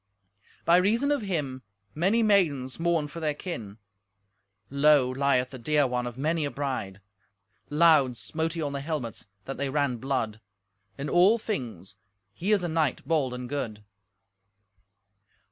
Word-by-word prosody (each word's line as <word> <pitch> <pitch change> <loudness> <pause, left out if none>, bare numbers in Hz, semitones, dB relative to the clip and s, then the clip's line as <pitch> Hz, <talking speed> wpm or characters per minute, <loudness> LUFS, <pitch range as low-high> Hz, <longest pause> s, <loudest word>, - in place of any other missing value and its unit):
By 170 +1 +6
reason 230 +10 +2
of 290 -3 +1
him 150 -10 -3 0.3
many 195 +9 +2
maidens 155 -12 +2
mourn 165 -3 +1
for 160 +3 -8
their 155 -2 -1
kin. 115 - -6 0.9
Low 140 -1 +5
lieth 130 -1 +1
the 130 - -8
dear 145 +4 +2
one 125 -1 -1
of 120 0 -7
many 155 +3 0
a 145 - -1
bride. 130 -9 -4 0.7
Loud 150 -5 +4
smote 160 +4 -3
he 165 -2 -3
on 145 -1 -3
the 140 - -3
helmets, 140 -9 -4 0.2
that 135 - -5
they 140 0 -1
ran 140 -3 0
blood. 115 -4 -2 0.6
In 140 - -4
all 185 +8 +5
things 115 - -5 0.4
he 185 - -2
is 205 -4 +3
a - - 0
knight 160 -5 -1
bold 150 -6 +1
and 125 0 -5
good." 115 -6 -4
145 Hz, 150 wpm, -27 LUFS, 125-170 Hz, 0.9 s, By